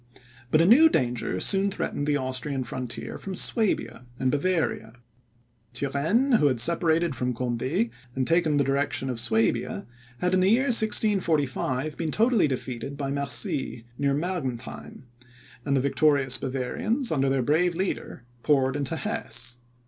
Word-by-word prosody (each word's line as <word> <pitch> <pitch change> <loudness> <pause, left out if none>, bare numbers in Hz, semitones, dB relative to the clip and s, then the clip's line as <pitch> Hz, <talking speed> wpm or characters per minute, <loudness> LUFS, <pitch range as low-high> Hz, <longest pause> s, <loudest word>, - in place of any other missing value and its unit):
But 155 +5 +4
a - - +4
new 280 - +7
danger 120 - -1
soon 195 - +3
threatened 145 -6 -3
the 145 -1 +2
Austrian 130 +1 -3
frontier 125 0 -6
from 195 -1 -6
Suabia 175 - -1
and 130 -1 0
Bavaria. 145 -7 -1 0.8
Turenne, 165 - +1
who 145 - +4
had 130 -4 0
separated 165 +2 +3
from 125 0 -2
Conde, 130 - -1 0.2
and 130 -1 0
taken 165 -2 +2
the 140 - +3
direction 135 -1 -1
of 120 - -2
Suabia, 115 -1 0 0.3
had, 180 +7 -1
in 185 - +3
the 185 +1 +3
year 255 +5 +3
1645, 155 - +1
been 165 -2 -2
totally 225 0 +2
defeated 130 +1 -5
by 135 -1 -3
Mercy, 140 -3 -1
near 140 +1 0
Mergentheim; 140 -6 -5 0.6
and 140 -1 0
the - - +2
victorious 140 -1 +2
Bavarians, 135 - -2
under 135 -3 +1
their 135 -1 +1
brave 165 +6 +1
leader, 185 -9 -4 0.2
poured 135 -2 +2
into 145 +2 -2
Hesse. 120 -3 -2
140 Hz, 145 wpm, -26 LUFS, 130-180 Hz, 0.8 s, new